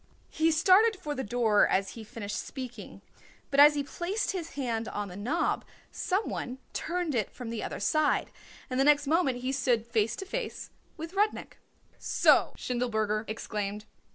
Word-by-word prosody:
He 320 Hz, +1 st, +2 dB
started 380 Hz, +7 st, +5 dB
for 300 Hz, -4 st, -4 dB
the 265 Hz, -, -3 dB
door 220 Hz, -1 st, +3 dB
as 195 Hz, +1 st, +1 dB
he 225 Hz, -, -9 dB
finished 210 Hz, -1 st, -5 dB
speaking, 255 Hz, -3 st, -8 dB, 0.5 s
but 280 Hz, -, +2 dB
as 295 Hz, +1 st, +9 dB
he 285 Hz, -, 0 dB
placed 350 Hz, +9 st, -2 dB
his 350 Hz, -4 st, -5 dB
hand 235 Hz, -5 st, -2 dB
on 205 Hz, -1 st, -4 dB
the 180 Hz, -, -9 dB
knob 250 Hz, -, 0 dB, 0.3 s
some 385 Hz, +4 st, -1 dB
one 250 Hz, +1 st, -4 dB, 0.2 s
turned 345 Hz, -2 st, -2 dB
it 225 Hz, -5 st, 0 dB
from 245 Hz, -3 st, -7 dB
the 230 Hz, -, -3 dB
other -, -, -4 dB
side 305 Hz, +9 st, +1 dB, 0.4 s
and 255 Hz, 0 st, -2 dB
the -, -, +5 dB
next 290 Hz, 0 st, +4 dB
moment 275 Hz, -5 st, +1 dB
he 255 Hz, +1 st, -1 dB
stood 250 Hz, -4 st, +1 dB
face 225 Hz, -2 st, 0 dB
to 385 Hz, -, -6 dB
face -, -, -5 dB, 0.3 s
with 325 Hz, +2 st, -7 dB
Rudnik. 415 Hz, +2 st, -1 dB, 0.4 s
"So!" -, -, +4 dB
Schindelberger 220 Hz, -3 st, -1 dB
exclaimed. 210 Hz, -1 st, -4 dB
260 Hz, 170 wpm, -29 LUFS, 220-320 Hz, 0.5 s, as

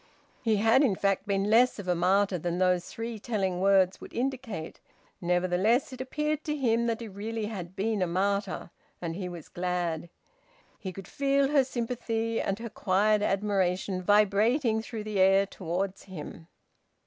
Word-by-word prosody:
He 225 Hz, -3 st, +2 dB
had 225 Hz, +5 st, +4 dB
in 245 Hz, -10 st, +3 dB
fact 195 Hz, +1 st, 0 dB
been 200 Hz, +1 st, 0 dB
less 245 Hz, +3 st, +5 dB
of 200 Hz, -3 st, -7 dB
a 180 Hz, -, +3 dB
martyr 185 Hz, +2 st, +2 dB
than 175 Hz, +2 st, -2 dB
those 180 Hz, -1 st, +2 dB
three 230 Hz, -1 st, -5 dB
telling 195 Hz, -6 st, -1 dB
words 190 Hz, -1 st, +3 dB
would -, -, -11 dB
indicate. 240 Hz, -9 st, -3 dB, 0.4 s
Nevertheless 185 Hz, +9 st, +1 dB
it 255 Hz, -, -6 dB
appeared 300 Hz, +3 st, -2 dB
to 300 Hz, -, -1 dB
him 235 Hz, -3 st, +1 dB
that 230 Hz, 0 st, -1 dB
he 230 Hz, -, -5 dB
really 215 Hz, +2 st, -4 dB
had 190 Hz, -4 st, -6 dB
been 210 Hz, +1 st, -1 dB
a 180 Hz, -, +2 dB
martyr; 195 Hz, +1 st, -1 dB, 0.3 s
and 165 Hz, -2 st, -4 dB
he 180 Hz, -1 st, -4 dB
was 170 Hz, -3 st, -9 dB
glad. 175 Hz, -2 st, -2 dB, 0.7 s
He 190 Hz, -3 st, -5 dB
could 195 Hz, 0 st, -10 dB
feel 275 Hz, 0 st, +1 dB
her 285 Hz, -2 st, +4 dB
sympathy 230 Hz, -2 st, -2 dB
and 195 Hz, -, -1 dB
her 230 Hz, +1 st, -6 dB
quiet 205 Hz, +3 st, +2 dB
admiration 195 Hz, -2 st, 0 dB
vibrating 215 Hz, -, +3 dB
through 225 Hz, -1 st, -6 dB
the 210 Hz, -2 st, -3 dB
air 195 Hz, +1 st, +5 dB
towards 190 Hz, +1 st, -4 dB
him. 165 Hz, -3 st, -9 dB
200 Hz, 165 wpm, -28 LUFS, 185-230 Hz, 0.7 s, less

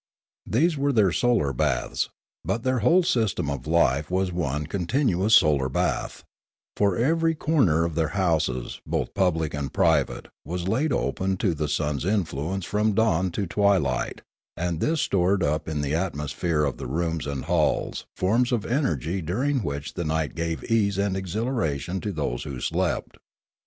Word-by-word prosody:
These 155 Hz, +7 st, +2 dB
were 140 Hz, +1 st, +2 dB
their 105 Hz, -7 st, +3 dB
solar 85 Hz, -, +2 dB
baths; 70 Hz, -2 st, 0 dB, 0.3 s
but 115 Hz, -, -2 dB
their 130 Hz, -1 st, +1 dB
whole 175 Hz, -, +4 dB
system 110 Hz, -, 0 dB
of 70 Hz, 0 st, -5 dB
life 75 Hz, -3 st, +2 dB
was 95 Hz, 0 st, 0 dB
one 75 Hz, -4 st, -2 dB
con 85 Hz, +2 st, -3 dB
tinuous 110 Hz, -6 st, +2 dB
solar 70 Hz, -8 st, +5 dB
bath: -, -, -2 dB, 0.5 s
for 100 Hz, -3 st, +2 dB
every 165 Hz, +6 st, +2 dB
corner 125 Hz, -, +2 dB
of 85 Hz, -, -3 dB
their 80 Hz, 0 st, +1 dB
houses 80 Hz, -9 st, 0 dB
both -, -, -2 dB
public 80 Hz, -5 st, +1 dB
and 70 Hz, -2 st, -3 dB
private -, -, +1 dB
was 90 Hz, +3 st, -4 dB
laid 135 Hz, +9 st, +1 dB
open 95 Hz, -6 st, -1 dB
to 95 Hz, -2 st, +1 dB
the 75 Hz, -1 st, -2 dB
sun's 75 Hz, -2 st, -1 dB
in 100 Hz, +2 st, +2 dB
fluence 85 Hz, +5 st, -4 dB
from 105 Hz, +1 st, +1 dB
dawn 95 Hz, -5 st, +2 dB
to 100 Hz, -, -1 dB
twilight, 90 Hz, -9 st, +1 dB, 0.4 s
and 85 Hz, -1 st, -2 dB
this 160 Hz, -, +1 dB
stored 95 Hz, 0 st, +2 dB
up 75 Hz, +2 st, 0 dB
in 75 Hz, -2 st, -2 dB
the 70 Hz, 0 st, -2 dB
atmosphere 80 Hz, -1 st, -1 dB
of 70 Hz, -2 st, -1 dB
the -, -, -6 dB
rooms 80 Hz, +2 st, -2 dB
and 70 Hz, -1 st, -4 dB
halls 85 Hz, -2 st, 0 dB
forms 115 Hz, +7 st, +2 dB
of 115 Hz, -4 st, 0 dB
energy 95 Hz, -, -1 dB
which -, -, -8 dB
during 130 Hz, -, 0 dB, 0.3 s
the 90 Hz, -, -3 dB
night 80 Hz, -1 st, -1 dB
gave 85 Hz, -1 st, -3 dB
ease 100 Hz, -4 st, +1 dB
and 100 Hz, -1 st, 0 dB
exhilaration 95 Hz, -, -2 dB
to 105 Hz, -, -3 dB
those 70 Hz, -8 st, -3 dB
who 65 Hz, -3 st, -6 dB
slept. -, -, -2 dB
90 Hz, 165 wpm, -25 LUFS, 75-110 Hz, 0.5 s, solar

